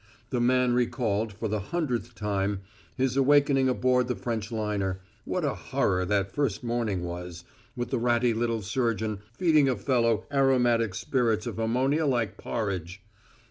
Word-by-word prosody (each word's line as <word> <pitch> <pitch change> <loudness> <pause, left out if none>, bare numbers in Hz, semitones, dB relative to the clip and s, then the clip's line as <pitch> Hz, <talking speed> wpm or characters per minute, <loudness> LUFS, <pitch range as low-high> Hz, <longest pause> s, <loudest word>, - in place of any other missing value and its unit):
The 125 -2 0
man 125 0 +3
recalled, 115 -3 0
for 110 +3 -4
the 105 0 -1
hundredth 125 - -3
time, 100 -1 -1 0.4
his 130 -1 +1
awakening 140 -1 +4
aboard 125 0 +2
the 125 - -1
French 115 -2 -4
liner 105 -4 -2 0.3
what - - -1
a - - 0
horror 90 0 0
that 100 0 0
first 135 -6 -1
morning 115 -6 -1
was, 85 0 -6 0.3
with 120 -1 -4
the 130 - +1
ratty 120 0 +2
little 115 -1 -1
surgeon 110 -2 -1
feeding 150 +1 +3
a 130 - +1
fellow 115 0 +1
aromatic 120 -6 +3
spirits 115 -4 0
of - - -5
ammonia 130 +7 +1
like 115 -6 0
porridge! 95 -3 -4
115 Hz, 150 wpm, -27 LUFS, 105-125 Hz, 0.4 s, awakening